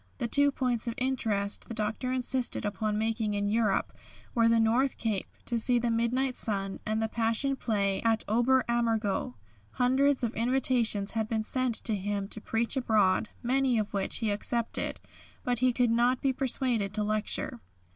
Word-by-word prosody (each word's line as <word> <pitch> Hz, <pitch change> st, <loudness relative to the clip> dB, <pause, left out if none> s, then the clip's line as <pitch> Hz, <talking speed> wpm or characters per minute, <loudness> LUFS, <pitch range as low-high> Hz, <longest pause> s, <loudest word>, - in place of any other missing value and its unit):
The 240 Hz, -, -2 dB
two 285 Hz, +4 st, +4 dB
points 245 Hz, -3 st, -1 dB
of 230 Hz, -, -2 dB
interest 225 Hz, -6 st, -1 dB
the 230 Hz, -, -6 dB
Doctor 220 Hz, +4 st, -2 dB
insisted 255 Hz, -2 st, -1 dB
upon 210 Hz, +1 st, -1 dB
making 220 Hz, -1 st, -1 dB
in 205 Hz, 0 st, 0 dB
Europe 215 Hz, -2 st, +1 dB, 0.4 s
were 230 Hz, -1 st, +3 dB
the 230 Hz, 0 st, +4 dB
North 240 Hz, +4 st, +2 dB
Cape, 215 Hz, -4 st, -2 dB, 0.2 s
to 235 Hz, -1 st, -1 dB
see 245 Hz, +2 st, +2 dB
the 240 Hz, 0 st, 0 dB
Midnight 250 Hz, +3 st, 0 dB
Sun, 195 Hz, -3 st, -2 dB
and 215 Hz, +1 st, 0 dB
the 220 Hz, -, 0 dB
Passion 230 Hz, +5 st, +1 dB
Play 200 Hz, -6 st, 0 dB
at 225 Hz, -1 st, +1 dB
Ober 240 Hz, +4 st, +3 dB
Ammergau. 225 Hz, -, 0 dB, 0.4 s
Hundreds 260 Hz, +2 st, +2 dB
of 235 Hz, 0 st, -1 dB
invitations 235 Hz, -4 st, +1 dB
had 220 Hz, -1 st, -2 dB
been 220 Hz, -1 st, 0 dB
sent 255 Hz, 0 st, 0 dB
to 220 Hz, -, +1 dB
him 200 Hz, 0 st, -3 dB
to 215 Hz, -, -6 dB
preach 230 Hz, +5 st, -1 dB
abroad, 215 Hz, -5 st, +2 dB
many 260 Hz, 0 st, +2 dB
of 215 Hz, -1 st, -2 dB
which 200 Hz, -1 st, -1 dB
he 220 Hz, -3 st, -1 dB
accepted, 230 Hz, +3 st, -1 dB, 0.4 s
but 245 Hz, -2 st, -1 dB
he 255 Hz, 0 st, +3 dB
could 245 Hz, -1 st, +1 dB
not 240 Hz, +2 st, +2 dB
be 270 Hz, -1 st, +1 dB
persuaded 250 Hz, -6 st, 0 dB
to 210 Hz, -, 0 dB
lecture. 210 Hz, -, -1 dB
230 Hz, 175 wpm, -29 LUFS, 215-250 Hz, 0.4 s, two